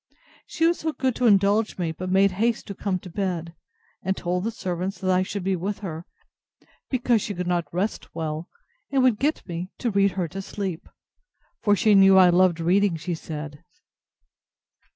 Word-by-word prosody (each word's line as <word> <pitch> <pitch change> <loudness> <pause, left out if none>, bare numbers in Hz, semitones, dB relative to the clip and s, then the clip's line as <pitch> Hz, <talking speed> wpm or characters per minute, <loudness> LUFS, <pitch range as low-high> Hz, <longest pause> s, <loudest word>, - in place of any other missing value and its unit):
She 325 - 0
was 340 +1 +2
so 315 0 -2
good 260 -3 0
to 250 - +2
indulge 205 +1 +3
me; 170 -3 -1
but 185 +3 -6
made 195 +1 +4
haste 225 +5 0
to 200 - -6
come 195 0 -2
up 180 - -4
to 185 - -10
bed; 175 -4 -3 0.5
and 190 0 -1
told 180 +1 -2
the - - +1
servants, 185 -3 -4
that 185 -1 -1
I 185 0 +3
should 190 +1 -4
be 190 0 +1
with 195 +3 -4
her, 165 -1 -6 0.8
because 245 -3 +2
she 205 - -4
could 180 +1 -3
not 175 -1 -1
rest 190 +5 -3
well, 155 +1 -4 0.4
and 270 -2 +2
would 250 -5 +3
get 300 +4 -1
me 175 +1 -5
to 240 - -1
read 200 -1 +2
her 180 -3 -1
to 195 +5 -6
sleep; 190 -3 -5 0.7
for 205 -1 +3
she 215 +1 +3
knew 195 -1 +7
I 180 -1 +7
loved 175 -1 +3
reading, 185 +2 +2
she 175 +3 -4
said. 150 -2 -7
190 Hz, 195 wpm, -24 LUFS, 175-205 Hz, 0.8 s, knew